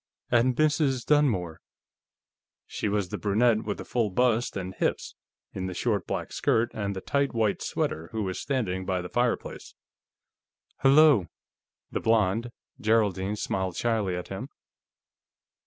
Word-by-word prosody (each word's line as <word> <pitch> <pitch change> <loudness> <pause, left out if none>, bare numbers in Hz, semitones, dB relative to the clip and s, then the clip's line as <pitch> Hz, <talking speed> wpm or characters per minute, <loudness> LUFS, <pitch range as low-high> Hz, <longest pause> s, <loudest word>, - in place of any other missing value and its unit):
"And 120 +1 +3
Mrs. 150 -4 +1
Dunmore." 110 - +1 1.0
She 105 - -3
was 100 -3 -1
the - - -4
brunette 110 +2 +2
with 105 - -3
the - - -8
full 115 -4 0
bust 120 +2 +1
and 95 -1 -5
hips, - - -2 0.4
in 95 0 -3
the 90 - -5
short 105 -4 -1
black - - -4
skirt 115 +1 +1
and 100 -2 -3
the 95 - -5
tight 140 +1 0
white 110 -3 +1
sweater, 80 +1 -2
who 110 -1 -2
was 95 -1 -3
standing 110 -9 -2
by 90 -1 -2
the 90 - -7
fireplace. 120 -1 -2 1.1
"H'lo." 140 - +6 0.6
The - - -1
blonde 110 +1 +1 0.3
Geraldine 105 -4 +1
smiled 95 -3 -2
shyly 110 -6 0
at 90 - -6
him. 105 +8 -6
110 Hz, 140 wpm, -27 LUFS, 95-120 Hz, 1.1 s, H'lo